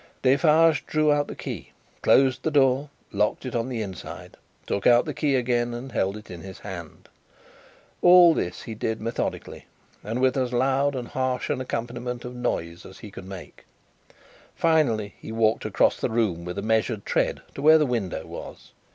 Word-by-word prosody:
Defarge 150 +4 +4
drew 155 -1 +2
out 145 0 +1
the - - -7
key, - - -7 0.3
closed 130 -1 +4
the - - 0
door, 140 -1 +2 0.2
locked 105 +5 0
it 130 - -5
on 120 +2 -1
the 115 -4 -2
inside, 95 -3 -9 0.3
took 100 - 0
out 120 0 +5
the - - -4
key 145 -3 +1
again, 120 -1 0
and 130 +2 -7
held 100 -2 -1
it 105 - -12
in 85 -2 -8
his 95 +1 -9
hand. 90 -6 -9 0.9
All 175 -1 +8
this 90 - -3
he 115 - -6
did, 110 +1 -3
methodically, 115 +1 -4 0.4
and 115 +4 -3
with 130 +1 +2
as 125 -2 -1
loud 135 +3 +1
and 125 -2 -5
harsh 130 -1 -1
an 130 - -1
accompaniment 120 0 -4
of 125 - -6
noise 85 -9 -3
as 95 - -12
he 105 - -11
could 95 - -10
make. 95 -2 -10 0.9
Finally, 130 -11 +1
he - - -8
walked 110 -1 +1
across - - +2
the - - 0
room 105 -7 0
with 90 +2 -5
a 100 - -3
measured 110 -1 0
tread - - 0
to - - -7
where 155 +2 +7
the 155 - +2
window 115 -9 -2
was. - - -10
120 Hz, 185 wpm, -25 LUFS, 105-135 Hz, 0.9 s, All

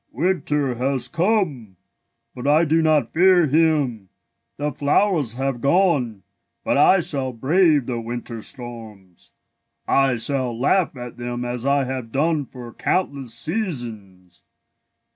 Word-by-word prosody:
winter 150 -3 0
has 130 +1 0
come, 165 - -1 0.6
but 125 +2 -6
I 155 +3 +4
do 160 +1 +2
not 155 -6 +1
fear 180 0 +5
him. 145 - +1 0.5
The 150 +1 -2
flowers 145 - +1
have 135 -1 -3
gone, 140 - +1 0.4
but - - 0
I 190 -1 +5
shall 135 -5 -2
brave 150 +3 +2
the 120 -2 -3
winter 115 0 -6
storms. 110 -8 -9 0.5
I 135 -2 +3
shall 125 -1 -1
laugh 160 +2 +1
at 125 -1 -8
them 120 0 -4
as 120 +1 -4
I 140 0 +2
have 130 -3 -5
done 150 +2 0
for 125 -2 -11
countless 140 -10 -1
seasons. 115 - -4
135 Hz, 125 wpm, -22 LUFS, 120-155 Hz, 0.6 s, fear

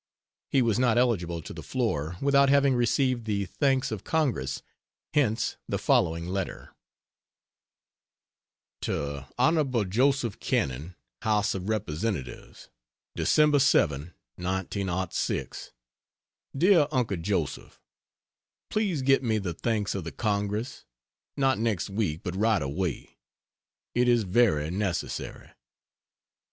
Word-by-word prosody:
He 135 -2 +3
was 115 -1 +1
not 120 -3 +3
eligible 90 -10 +1
to - - -8
the - - -8
floor 90 - -2
without 140 0 +4
having 140 -1 +4
received 120 0 +1
the 100 -2 -1
thanks 135 +4 0
of 110 -3 -4
Congress, 130 - -1 0.5
hence 125 -7 +1
the - - 0
following 85 0 +2
letter: 95 +1 -4 2.1
To 70 -1 -3
Hon. 130 -4 +2
Joseph 125 -1 +1
Cannon, 70 +7 -2 0.3
House 105 -1 +1
of 95 +1 -4
Representatives: 100 - -4 0.5
Dec. 150 -2 +4
7, 75 - +2 0.2
1906. 95 0 -2 0.9
DEAR 170 -2 +5
UNCLE 120 -8 0
JOSEPH, 85 -5 -3 0.9
Please 195 -10 0
get 135 0 +4
me 115 -4 +1
the 95 -5 -3
thanks 105 +2 -1
of 95 - -3
the 80 - -6
Congress 105 +3 -2 0.5
not 135 -3 +2
next 110 -4 -1
week 95 -7 -1
but 90 - -4
right 110 +1 +2
away. 80 +5 -4 0.7
It 125 +1 +2
is 120 -2 +4
very 90 -7 +2
necessary. 95 -2 -3
105 Hz, 110 wpm, -27 LUFS, 90-130 Hz, 2.1 s, DEAR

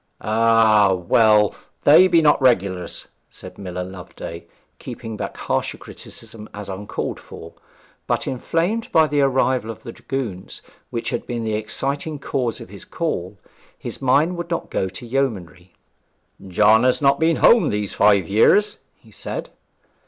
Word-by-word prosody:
'Ah! 110 -2 +4
well 105 +3 +3 0.3
they 165 +6 +7
be 170 -2 +3
not 145 -2 +4
regulars,' 95 -8 0 0.2
said 90 +1 -13
Miller 90 -2 -5
Loveday, 90 -2 -9 0.3
keeping 115 -1 -8
back - - -6
harsher - - -2
criticism 110 -1 -12
as 105 -1 -8
uncalled 95 +2 -5
for. - - -12 0.5
But - - -1
inflamed 170 - -2
by 160 -1 +5
the 145 -1 0
arrival 130 -3 +1
of 115 - -8
the 115 - -7
dragoons, 115 -9 -6 0.3
which 115 - -4
had - - -4
been 120 -1 -3
the 110 -1 -2
exciting 140 +8 -3
cause 125 -4 -3
of - - -11
his 100 0 -11
call, 100 - -4 0.4
his - - -7
mind 145 +7 +2
would 170 0 -5
not 170 - -4
go 95 - -1
to 95 +6 -10
yeomanry. 95 -9 -3 0.7
'John 110 +5 +4
has 130 0 +2
not 140 -1 +3
been 165 0 +2
home 235 +7 +5
these 105 -1 -3
five 100 -4 +3
years,' 205 - +3 0.2
he - - -22
said. - - -7
115 Hz, 150 wpm, -21 LUFS, 100-140 Hz, 0.7 s, they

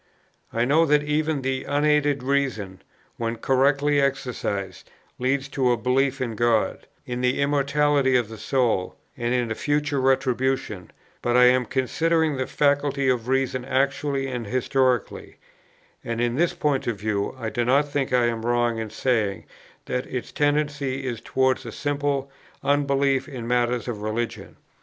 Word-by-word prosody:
I 115 +1 +1
know 150 +6 +4
that 150 0 +3
even 150 -1 0
the 130 0 -1
unaided 145 -1 +2
reason, 130 -9 -1 0.4
when 115 0 -2
correctly 140 +4 +2
exercised, 125 -7 -3 0.3
leads 135 +2 0
to 130 -3 +1
a 120 - +2
belief 130 +4 +1
in 120 -3 -2
God, 115 0 +1 0.2
in 125 0 -4
the 125 0 +1
immortality 140 -1 +2
of 120 -3 +2
the 110 0 -10
soul, 115 -5 0 0.2
and 120 0 -2
in 125 -2 0
a - - +2
future 145 +2 0
retribution; 130 -7 0 0.3
but 120 0 +2
I 125 - +7
am 125 0 +2
considering 160 +4 +1
the 130 - -2
faculty 140 -1 +1
of 125 -2 0
reason 130 -1 0
actually 135 +1 0
and 125 -4 -4
historically; 130 +1 0 0.7
and 115 0 -3
in 120 0 0
this 175 +4 +1
point 145 -5 0
of 120 - 0
view, 105 +1 -2
I 110 -2 -3
do 120 - 0
not 140 +5 +3
think 140 -2 -2
I 125 -1 +3
am 115 -1 -1
wrong 120 -1 +1
in 110 -1 -4
saying 110 -3 -1 0.4
that 125 - -3
its 125 -2 -5
tendency 145 -2 0
is 120 -3 -4
towards 130 0 +1
a 115 - -7
simple 140 0 -2 0.3
unbelief 140 -2 +1
in 125 -5 -6
matters 120 0 0
of 110 -4 -4
religion. 110 +2 -4
130 Hz, 155 wpm, -24 LUFS, 120-140 Hz, 0.7 s, I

